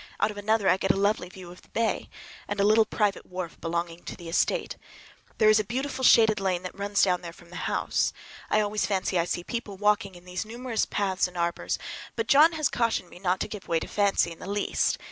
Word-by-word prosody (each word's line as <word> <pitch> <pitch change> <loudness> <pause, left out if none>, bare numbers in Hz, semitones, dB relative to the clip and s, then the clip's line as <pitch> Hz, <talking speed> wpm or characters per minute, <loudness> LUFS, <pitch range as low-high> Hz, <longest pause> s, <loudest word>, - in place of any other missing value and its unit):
Out 215 - +2
of 205 - -11
another 205 0 +1
I 185 - +5
get 195 - -2
a - - +4
lovely 200 -2 +1
view 185 -1 -11
of 180 - -14
the - - -24
bay 230 -1 -1 0.4
and 205 0 -3
a - - +4
little 215 +2 +5
private 210 -2 0
wharf 180 -2 -7
belonging 170 +1 -3
to - - -6
the 170 -2 -9
estate. 485 - 0 0.6
There 215 - +4
is 215 0 +6
a - - +1
beautiful 260 +5 -3
shaded 220 -4 +6
lane 185 -2 -1
that 185 - -6
runs 200 0 +1
down 180 -2 +2
there 170 -1 -7
from 170 0 -18
the 180 - -4
house. - - 0 0.4
I 215 - +3
always 210 0 0
fancy 190 -2 0
I 170 - +2
see 175 0 -2
people 220 -2 -5
walking 205 -1 +1
in 175 0 -14
these 180 +2 -4
numerous 235 +1 -2
paths 190 -3 0
and 180 0 -11
arbors, 170 0 -1 0.4
but 455 - -1
John 310 +4 +6
has 310 -2 +1
cautioned 230 -6 -1
me 175 - -12
not 185 0 0
to - - -1
give 210 -2 -8
way 165 -1 +1
to - - -5
fancy 200 -4 +2
in 165 - -10
the - - -8
least. 205 0 0
200 Hz, 240 wpm, -27 LUFS, 180-215 Hz, 0.6 s, is